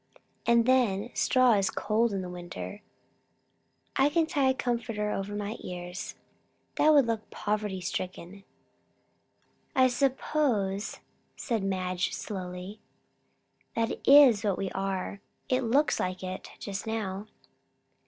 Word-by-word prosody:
"And 235 Hz, -1 st, +5 dB
then, 240 Hz, -4 st, +2 dB
straw 255 Hz, -1 st, +4 dB
is 195 Hz, -2 st, +2 dB
cold 225 Hz, +2 st, +1 dB
in 185 Hz, -2 st, -3 dB
winter." 180 Hz, +3 st, -7 dB, 1.1 s
"I 270 Hz, +2 st, +4 dB
can 330 Hz, +2 st, +2 dB
tie 285 Hz, -4 st, +2 dB
a -, -, +4 dB
comforter 230 Hz, -4 st, -2 dB
over 200 Hz, +1 st, -3 dB
my 205 Hz, +1 st, -3 dB
ears." 180 Hz, 0 st, -6 dB, 0.6 s
"That 310 Hz, -, +5 dB
would 285 Hz, -4 st, +6 dB
look 225 Hz, -2 st, -3 dB
poverty 210 Hz, -2 st, -2 dB
stricken." 185 Hz, +1 st, -5 dB, 1.3 s
"I 260 Hz, -1 st, +5 dB
suppose," 245 Hz, -6 st, 0 dB, 0.3 s
said 230 Hz, -5 st, -2 dB
Madge 185 Hz, -2 st, -1 dB
slowly, 185 Hz, +1 st, -6 dB, 1.0 s
"that 230 Hz, 0 st, -1 dB
is 270 Hz, -7 st, +8 dB
what 200 Hz, -3 st, +1 dB
we 195 Hz, -, -3 dB
are. 195 Hz, 0 st, -3 dB, 0.3 s
It 255 Hz, 0 st, +2 dB
looks 275 Hz, +6 st, +2 dB
like 185 Hz, +1 st, -2 dB
it, 185 Hz, 0 st, -5 dB
just 200 Hz, +1 st, -5 dB
now." 210 Hz, -2 st, -3 dB
210 Hz, 120 wpm, -29 LUFS, 190-245 Hz, 1.3 s, is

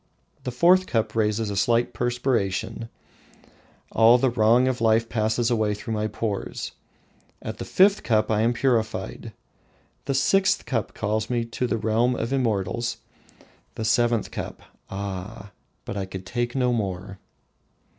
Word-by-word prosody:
The 125 Hz, -, -2 dB
fourth 180 Hz, +9 st, +4 dB
cup 115 Hz, -3 st, 0 dB
raises 110 Hz, -1 st, 0 dB
a -, -, -3 dB
slight 120 Hz, +5 st, +2 dB
perspiration, 120 Hz, -2 st, -1 dB, 1.0 s
all 115 Hz, +2 st, +6 dB
the 125 Hz, 0 st, +2 dB
wrong 120 Hz, +2 st, +4 dB
of 130 Hz, -3 st, -1 dB
life 115 Hz, 0 st, +3 dB
passes 115 Hz, +1 st, 0 dB
away 110 Hz, -3 st, +1 dB
through 110 Hz, +2 st, -5 dB
my 105 Hz, 0 st, -1 dB
pores. 105 Hz, -1 st, -4 dB, 0.7 s
At -, -, -7 dB
the -, -, -4 dB
fifth 195 Hz, +2 st, +4 dB
cup 110 Hz, -1 st, +1 dB
I 105 Hz, 0 st, +2 dB
am 115 Hz, +2 st, +3 dB
purified; 120 Hz, -3 st, -1 dB, 0.7 s
the 135 Hz, -, -1 dB
sixth 190 Hz, +8 st, +2 dB
cup 115 Hz, -5 st, -2 dB
calls 110 Hz, +1 st, -1 dB
me 120 Hz, -2 st, 0 dB
to 115 Hz, +2 st, -3 dB
the 115 Hz, -, 0 dB
realms 115 Hz, +3 st, +1 dB
of 115 Hz, -, -2 dB
the 135 Hz, -, +2 dB
immortals. 115 Hz, -1 st, -1 dB, 0.8 s
The 110 Hz, -, -3 dB
seventh 120 Hz, 0 st, +2 dB
cup -, -, -6 dB, 0.3 s
ah, 100 Hz, +1 st, -6 dB, 0.3 s
but -, -, -5 dB
I 100 Hz, -1 st, -2 dB
could 95 Hz, 0 st, -8 dB
take 120 Hz, +5 st, -2 dB
no 125 Hz, -2 st, +2 dB
more! 95 Hz, -3 st, -3 dB
115 Hz, 150 wpm, -24 LUFS, 105-120 Hz, 1.0 s, all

